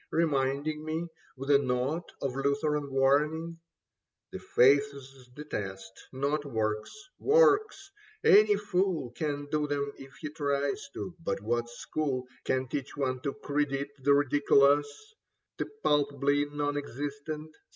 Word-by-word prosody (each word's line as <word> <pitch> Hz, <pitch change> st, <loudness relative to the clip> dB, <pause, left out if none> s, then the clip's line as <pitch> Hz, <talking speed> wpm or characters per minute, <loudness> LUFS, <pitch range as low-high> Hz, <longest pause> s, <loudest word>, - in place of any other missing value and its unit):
Reminding 150 Hz, -1 st, 0 dB
me 160 Hz, +2 st, -3 dB, 0.3 s
with 135 Hz, +2 st, -2 dB
a 140 Hz, -, +7 dB
note 135 Hz, +5 st, -1 dB
of 135 Hz, -2 st, -2 dB
Lutheran 140 Hz, +1 st, 0 dB
warning 150 Hz, +5 st, +1 dB, 0.7 s
That -, -, -7 dB
faith's 135 Hz, -1 st, +2 dB
the 150 Hz, -, -7 dB
test, 95 Hz, -8 st, -7 dB
not 140 Hz, +3 st, -1 dB
works. 110 Hz, -5 st, -2 dB, 0.3 s
Works! 425 Hz, -3 st, +3 dB, 0.2 s
— 430 Hz, 0 st, -29 dB
any 210 Hz, +1 st, +7 dB
fool 185 Hz, -, -1 dB
Can 145 Hz, +2 st, -3 dB
do 150 Hz, -1 st, +1 dB
them 140 Hz, -1 st, -2 dB
if 135 Hz, 0 st, -12 dB
he 155 Hz, -, -6 dB
tries 145 Hz, +4 st, -1 dB
to; 180 Hz, -, -5 dB
but 100 Hz, -, -1 dB
what 120 Hz, +1 st, -1 dB
school 130 Hz, +1 st, -3 dB, 0.2 s
Can 130 Hz, 0 st, 0 dB
teach 140 Hz, +3 st, -5 dB
one 130 Hz, -2 st, -1 dB
to 140 Hz, +2 st, -3 dB
credit 145 Hz, -1 st, -1 dB
the 140 Hz, +2 st, +4 dB
ridiculous, 145 Hz, 0 st, +4 dB, 0.7 s
The -, -, -1 dB, 0.2 s
palpably 145 Hz, 0 st, +2 dB
non 145 Hz, 0 st, -2 dB
existent 145 Hz, +3 st, -5 dB
145 Hz, 130 wpm, -29 LUFS, 135-155 Hz, 0.7 s, a